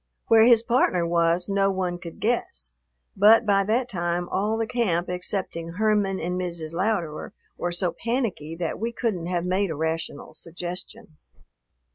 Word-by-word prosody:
Where 225 -1 +7
his 235 -2 +6
partner 230 -8 +2
was, 170 +1 +2
no 195 0 +2
one 185 -2 -2
could 170 -1 -9
guess. 65 - -1 0.4
But 220 +4 +6
by 200 -1 +3
that 235 +4 +1
time 175 -4 -2
all 210 +3 0
the 225 - 0
camp 190 -8 0
excepting 180 -2 -3
Herman 205 -1 +1
and 180 +2 -2
Mrs. 170 -3 -3
Louderer 175 -4 -2 0.2
were 175 - -2
so 175 0 +1
panicky 230 - -2
that 165 -1 -3
we 230 +1 -2
couldn't 210 -8 -2
have 175 -1 -1
made 190 +2 +1
a 160 - -3
rational 160 -1 -3
suggestion. 175 +3 -7
180 Hz, 155 wpm, -25 LUFS, 170-215 Hz, 0.4 s, Where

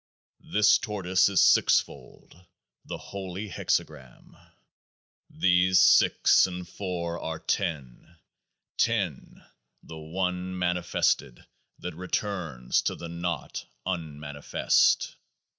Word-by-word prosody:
This 105 0 +5
Tortoise 95 -6 +1
is 100 - +3
sixfold, 90 +1 +1 0.4
the - - -6
Holy 100 +1 -7
Hexagram. 65 -7 -3 1.0
15 - - -19
These 90 0 +4
six - - +5
and 90 -1 -7
four 85 -2 -4
are 80 0 -4
ten, 75 -1 -4 0.6
10, - - -2 0.4
the 80 - -10
One 90 +3 -3
mani 90 0 0
fested 70 -6 -1 0.3
that 90 - -6
returns 90 - -2
into - - -2
the 85 - -8
Naught 85 +1 -5 0.2
un 80 -6 -4
manifest. 75 -1 +1
90 Hz, 100 wpm, -27 LUFS, 80-95 Hz, 1.0 s, This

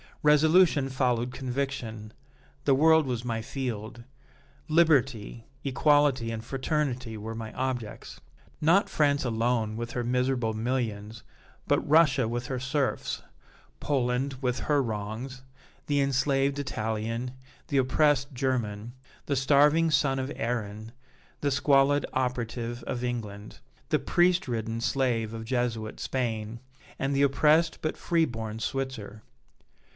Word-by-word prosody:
Resolution 150 -1 +5
followed 125 -2 0
conviction; 125 -5 -4 0.5
the 140 - +4
world 160 +1 +5
was 120 -2 -3
my 115 -2 -2
field; 120 -2 -5 0.6
liberty, 135 -9 +2 0.2
equality 140 -3 +2
and 110 -1 -5
fraternity 130 -3 -2
were 110 +2 -6
my 110 -1 -6
objects. 125 -5 -4 0.4
Not 170 +7 +3
France 145 -2 +2
alone, 115 -2 0
with 120 +1 -4
her 120 - -2
miserable 125 -2 0
millions, 110 -2 -3 0.4
but - - +1
Russia 145 -5 +4
with 120 +1 -3
her 130 -2 -3
serfs, 135 +2 -2 0.6
Poland 130 -1 0
with 125 -2 -1
her 145 -2 +2
wrongs, 115 +3 -5 0.4
the 145 -1 +2
enslaved 135 +1 +1
Italian, 115 -2 -3 0.4
the 140 - 0
oppressed 140 +1 +2
German, 120 -4 -2 0.3
the 140 - 0
starving 145 +4 +4
son 135 -3 +2
of 130 +1 -3
Erin, 110 -2 -3 0.5
the 145 - +1
squalid 140 +1 +3
operative 120 -2 -2
of 120 +1 -4
England, 110 -4 -5 0.3
the - - +2
priest 180 -1 +2
ridden 115 -1 -3
slave 115 -4 0
of 115 0 -6
Jesuit 115 -3 -2
Spain, 115 -3 -3 0.4
and 135 +1 0
the 140 - +3
oppressed 155 +4 +3
but 155 - -2
free 165 -1 +2
born 110 -4 -5
Switzer. 115 -5 -4
125 Hz, 120 wpm, -28 LUFS, 115-140 Hz, 0.6 s, Resolution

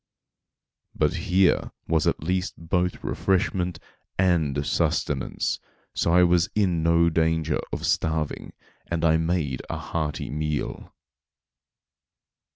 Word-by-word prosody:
But - - +2 0.2
here 95 0 +3 0.2
was 80 -2 +2
at - - 0
least 90 +3 -1
both 90 +2 -1
refreshment 90 -2 0 0.4
and 80 -7 +2
sustenance, 65 0 0 0.3
so - - +1
I 90 +1 +6
was 85 -1 +3
in 90 -6 +2
no 85 +1 +4
danger 80 -1 +1
of - - -3
starving, 80 -2 -1 0.3
and 85 -1 -1
I 80 -1 +5
made 80 -5 -1
a - - -2
hearty 75 -4 -3
meal. 75 0 -3
85 Hz, 110 wpm, -25 LUFS, 80-90 Hz, 0.4 s, I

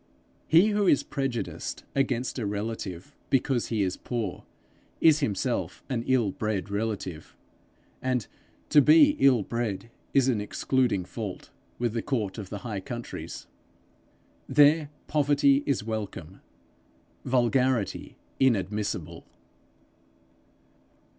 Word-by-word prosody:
He 170 +7 +6
who 205 -2 +1
is 145 - +4
prejudiced 135 -5 -4
against 130 -2 0
a 115 - -2
relative 100 -4 -5
because 130 -2 +1
he 110 -3 0
is 95 -1 -2
poor, 120 -3 -4 0.5
is 155 -2 +5
himself 105 -10 -2
an 120 -3 0
ill 120 -6 +2
bred 105 -1 -3
relative, 100 -6 -4 0.7
and 125 -4 0 0.4
to 150 - +7
be 150 +2 +7
ill 130 -5 +5
bred 115 -1 -3 0.2
is 135 -2 +3
an 115 -6 +1
excluding 110 -2 0
fault 105 -4 -7 0.3
with 120 -2 -1
the 115 - -1
court 110 -7 -2
of 100 -3 -7
the 100 -2 -6
high 105 -4 -3
countries. 120 +5 -7 1.0
There, 150 +1 +5 0.2
poverty 145 -1 +3
is 140 -6 +1
welcome, 105 -5 -5 0.8
vulgarity 125 -2 +1 0.2
inadmissible. 105 -5 0
120 Hz, 110 wpm, -27 LUFS, 105-135 Hz, 1.0 s, to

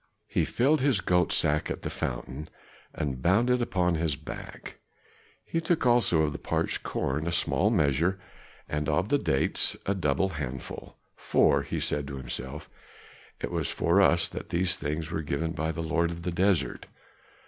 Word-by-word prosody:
He - - +1
filled 140 +4 +2
his 135 -6 +3
goat 90 -1 +2
skin 75 -1 +3
at - - -4
the - - -3
fountain 65 +4 -4 0.4
and 65 -3 -3
bound 105 - +3
it 125 0 +2
upon 90 -6 +1
his 80 -2 0
back; 75 +2 -9 0.7
he 165 - -1
took 165 -3 0
also 120 -10 +4
of 75 - +1
the - - -6
parched - - -1
corn 80 +2 -2
a - - 0
small - - +2
measure, 80 +7 +2 0.5
and 75 +1 -2
of 75 +6 +1
the 145 +1 +3
dates 65 - +1
a 100 - +1
double 85 0 +1
handful; 70 -6 -6 0.2
"for," - - +3
he - - -3
said 75 -1 -1
to 70 0 -6
himself, 65 +3 -6 0.7
"it - - -3
was - - -1
for 85 +5 +3
us 85 -3 +4
that - - -7
these 90 +1 +1
things 75 +2 -3
were 80 - -1
given 80 +2 -2
by 80 0 -2
the 80 0 -4
lord 85 +1 +1
of 85 0 -6
the 90 - -1
desert." 90 +1 +1
80 Hz, 175 wpm, -28 LUFS, 75-95 Hz, 0.7 s, also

